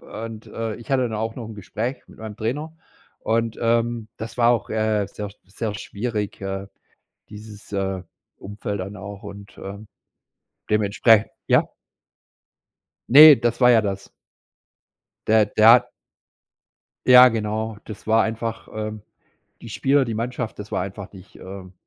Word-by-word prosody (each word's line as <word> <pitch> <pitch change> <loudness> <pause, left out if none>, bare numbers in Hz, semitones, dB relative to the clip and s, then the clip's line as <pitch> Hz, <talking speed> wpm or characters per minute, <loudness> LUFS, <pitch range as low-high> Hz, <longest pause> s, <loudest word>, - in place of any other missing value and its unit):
und, 115 -1 -8
äh, 115 -2 -4
ich 120 +1 -13
hatte 135 -1 +2
dann 115 -3 -2
auch 110 +1 -3
noch 115 -3 -6
'n 110 - -9
Gespräch 110 +6 -5
mit - - -17
meinem 110 -1 -8
Trainer 145 +9 -4 0.5
und, 115 0 -1
ähm, 115 -1 0
das 115 +2 -8
war 120 -1 +4
auch, 120 -4 0
äh, 110 -2 0
sehr, 105 0 -7 0.2
sehr 105 +2 -5
schwierig, 105 0 -4
äh, 95 0 -4 0.6
dieses, 105 -1 -12
äh, 95 -2 -2 0.3
Umfeld 105 0 -6
dann 95 +3 -6
auch 100 +1 -9
und, 100 0 -11
ähm, 100 +2 -9 0.8
dementsprechend 105 +1 +3 0.2
Ja? - - +3 1.4
Ne, 150 +1 +10
das 120 +1 -1
war 125 0 +6
ja 110 -2 +5
das. 100 -1 -4 1.2
Der, 110 -1 +4
der 110 +2 +4
hat 120 0 +5 1.2
Ja, 125 0 +9
genau. 110 -1 -3
Das 110 -1 -10
war 110 0 +4
einfach, 115 0 -4
ähm 110 -1 -5 0.6
die 115 - -9
Spieler, 135 +4 +1
die 115 - -3
Mannschaft, 120 0 -4
das 105 0 -9
war - - 0
einfach 100 +1 -8
nicht, 95 0 -15
ähm 95 -1 -10
110 Hz, 150 wpm, -22 LUFS, 100-115 Hz, 1.4 s, Ne